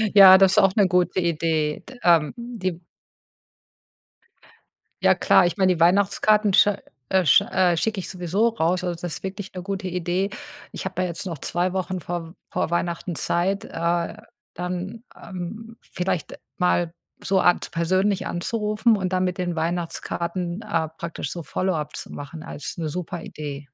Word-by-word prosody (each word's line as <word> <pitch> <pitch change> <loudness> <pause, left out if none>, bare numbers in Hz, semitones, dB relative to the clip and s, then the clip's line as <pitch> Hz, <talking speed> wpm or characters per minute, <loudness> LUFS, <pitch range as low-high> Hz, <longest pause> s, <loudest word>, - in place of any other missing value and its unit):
Ja, 190 -1 +11
das 190 -1 +4
auch 195 0 +5
'ne 205 -4 +5
gute 180 0 +2
Idee. 160 -3 0
D 255 -2 -12
ähm, 165 -1 +4
di 195 -8 -4 2.2
Ja, - - +6
klar. 180 - +5
Ich 175 - -4
meine, 185 -1 +4
die 165 - -6
Weihnachtskarten 200 +3 +3
sch - - +6 0.4
äh, 190 -1 +3
sch 140 - +7
äh, 180 -2 +2
schicke 210 +4 -1
ich - - -5
sowieso 190 +5 0
raus. 180 -3 0
Also, 175 -2 -3
das 175 0 -5
wirklich 190 0 -5
'ne 180 - -5
gute 195 -1 -4
Idee. 180 +2 -1 0.4
Ich - - -7
habe - - -2
ja 180 - +1
jetzt 170 +3 -6
noch 165 -5 -5
2 175 +5 -1
Wochen 185 -1 -2
vorm 170 0 -5 0.2
vor - - -1
Weihnachten 170 0 -2
Zeit, 185 +6 0
äh, 170 +1 -1 0.4
dann, 180 +5 -5 0.2
ähm, 215 +5 -8
vielleicht 180 -3 -3 0.2
mal 175 -2 +1 0.3
so 190 -1 +2
Art 175 - +2
persönlich 185 +4 +1
anzurufen 215 +4 +1
und 185 -2 -2
dann 185 0 +1
mit 180 +1 -2
den 175 -2 -1
Weihnachtskarten, 170 +2 -3
äh, 165 -7 -1
praktisch 165 -4 -5
so 170 - -5
Follow-up 160 -3 -2
zu - - -7
machen 155 +3 -8
als 150 - -7
'ne 160 -2 -2
super 175 +1 -5
Idee. 145 -2 -7
180 Hz, 160 wpm, -24 LUFS, 170-190 Hz, 2.2 s, Ja